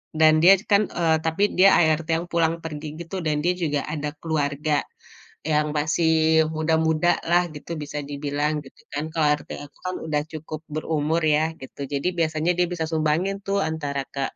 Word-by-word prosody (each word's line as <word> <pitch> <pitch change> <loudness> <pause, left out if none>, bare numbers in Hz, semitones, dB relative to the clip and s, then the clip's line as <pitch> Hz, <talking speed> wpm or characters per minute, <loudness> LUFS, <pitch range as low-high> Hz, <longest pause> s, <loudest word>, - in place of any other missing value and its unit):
Dan 155 0 +5
dia 185 +4 +8 0.2
kan, 200 0 +4
eee, 165 -2 +1
tapi 160 +5 -1 0.2
dia 195 +1 +7
ART 160 -1 +2
yang 165 - -1
pulang-pergi 165 -2 -1 0.2
gitu 185 +3 -5
dan 150 -3 -1
dia 175 - +3
juga 145 -3 0
ada 150 0 -4
keluarga 150 -1 -1 0.6
yang 150 -1 +1
masih 160 +1 +3
muda-mudalah 160 +2 +2
gitu 150 - -11
bisa 150 0 -5
dibilang 145 +1 -2
gitu 135 - -17 0.2
kan. 155 +2 -3
Kalau 160 -2 +1
ART 150 0 0
aku 145 0 -11
kan - - -4
udah 150 -1 0
cukup 155 0 -6
berumur 155 +1 -1
ya 155 +1 +3
gitu. 130 - -12
Jadi 140 +4 -1
biasanya 155 +1 +1
dia 180 0 +2
bisa 165 -2 -2
sumbangin 165 +5 0
tuh 200 0 -1
antara 145 -6 -2
ke 140 - -2
155 Hz, 165 wpm, -24 LUFS, 150-165 Hz, 0.6 s, dia